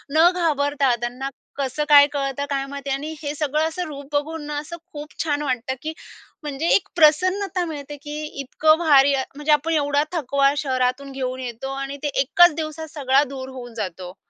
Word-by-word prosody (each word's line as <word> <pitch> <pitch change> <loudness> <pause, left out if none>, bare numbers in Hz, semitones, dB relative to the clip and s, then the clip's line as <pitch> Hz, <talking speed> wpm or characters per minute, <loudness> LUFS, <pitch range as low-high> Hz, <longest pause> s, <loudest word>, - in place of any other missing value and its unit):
न 325 +2 +7
घाबरता, 285 -6 +1
त्यांना 250 +3 -3 0.3
कसं 275 +1 -1
काय 285 -1 +9
कळतं 275 0 -2
काय 275 -1 -1
माहिती 280 0 -6
आणि 285 +4 -3
हे 290 -1 -3
सगळं 305 +1 0
असं 325 +3 -4
रूप 285 -2 -8
बघून 305 +2 -2
ना, 295 -1 -3
असं 325 +3 -8 0.2
खूप 295 0 -8
छान 295 -2 -1
वाटतं, 260 -2 -2
की 315 +1 -4 0.5
म्हणजे 295 +2 -3
एक 400 - +1
प्रसन्नता 365 +4 +3
मिळते, 295 -3 -7
की 295 +2 -7 0.2
इतकं 310 +4 +3
भारी 285 -4 +5
अ, 265 -1 +1
म्हणजे 295 +1 -1
आपण 300 +2 +2
एवढा 290 -1 +2
थकवा 280 -4 +2
शहरातून 260 0 -1
घेऊन 260 -1 -4
येतो. 250 +1 -5
आणि 275 +1 -5
ते - - +1
एकाच 350 +5 +5
दिवसात 315 0 -5
सगळा 275 -1 +3
दूर 265 -1 -7
होऊन 250 -2 -9
जातो. 185 -3 -5
285 Hz, 180 wpm, -22 LUFS, 270-310 Hz, 0.5 s, काय